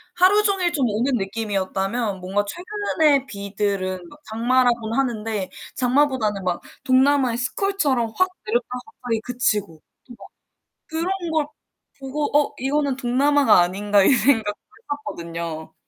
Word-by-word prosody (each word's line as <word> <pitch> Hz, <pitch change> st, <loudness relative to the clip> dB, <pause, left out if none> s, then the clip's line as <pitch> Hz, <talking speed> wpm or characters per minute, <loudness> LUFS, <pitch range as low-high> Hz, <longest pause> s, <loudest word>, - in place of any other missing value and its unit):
하루 380 Hz, +4 st, +5 dB
종일 385 Hz, -4 st, +1 dB
좀 280 Hz, -5 st, +1 dB
오는 235 Hz, +6 st, 0 dB
느낌이었다면 200 Hz, 0 st, -2 dB
뭔가 195 Hz, +3 st, -1 dB
최근에 335 Hz, -, +1 dB
비들은 200 Hz, -4 st, -3 dB
막 290 Hz, -, -16 dB
장마라고는 235 Hz, 0 st, +1 dB
하는데 220 Hz, -6 st, -1 dB, 0.3 s
장마보다는 250 Hz, -6 st, +1 dB
막 180 Hz, -1 st, -1 dB, 0.2 s
동남아의 260 Hz, -2 st, +3 dB
스콜처럼 260 Hz, -, 0 dB
확 370 Hz, 0 st, +3 dB, 0.2 s
내렸다가 240 Hz, +3 st, -1 dB
갑자기 235 Hz, -3 st, -4 dB
그치고. 210 Hz, -9 st, -1 dB, 0.2 s
좀 245 Hz, -, -12 dB
막 -, -, -12 dB, 0.6 s
그런 340 Hz, +1 st, -2 dB
걸 310 Hz, -2 st, +1 dB, 0.5 s
보고 290 Hz, +2 st, -3 dB
어 295 Hz, -, +1 dB
이거는 275 Hz, +1 st, 0 dB
동남아가 270 Hz, -2 st, +4 dB
아닌가 200 Hz, +3 st, +2 dB
이 -, -, +5 dB
생각도 225 Hz, -5 st, +2 dB, 0.3 s
했었거든요. 170 Hz, -, -5 dB
245 Hz, 310 characters per minute, -22 LUFS, 205-285 Hz, 0.6 s, 하루